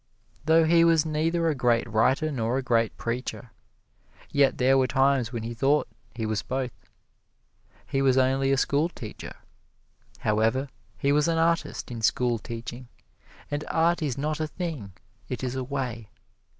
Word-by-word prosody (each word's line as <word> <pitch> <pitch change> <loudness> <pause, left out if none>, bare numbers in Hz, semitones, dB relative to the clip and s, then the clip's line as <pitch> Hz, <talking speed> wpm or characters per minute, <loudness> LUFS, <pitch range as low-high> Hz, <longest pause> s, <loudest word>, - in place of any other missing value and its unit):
Though 160 +1 +5
he 165 +1 +5
was 165 -2 +4
neither 165 +2 0
a 160 - +2
great 120 -3 +1
writer 130 +8 +2
nor 120 -2 -1
a 135 - -2
great 115 -3 +1
preacher, 120 0 -4 0.8
yet 140 -2 +3
there 130 +1 +4
were 130 -1 +3
times 135 -1 +2
when 115 -3 -4
he 115 +1 -4
thought 140 +5 +2 0.3
he 115 -2 -3
was 110 -2 -1
both. 130 -1 -3 1.1
He 135 - -1
was 135 -1 +3
only 135 +1 +2
a 135 - +3
schoolteacher. 140 -5 -2 0.9
However, 115 +6 +1 0.3
he 140 - +1
was 150 +2 +3
an 165 -1 +1
artist 165 -4 0
in 115 -2 -5
schoolteaching, 120 +1 -1 0.6
and 145 +1 -2
art 170 +2 +2
is 140 -5 -2
not 150 +2 -2
a 155 - -1
thing 150 - -5 0.4
it 125 -1 -4
is 125 -1 -2
a 130 - -2
way. 125 -5 -4
135 Hz, 155 wpm, -26 LUFS, 120-150 Hz, 1.1 s, Though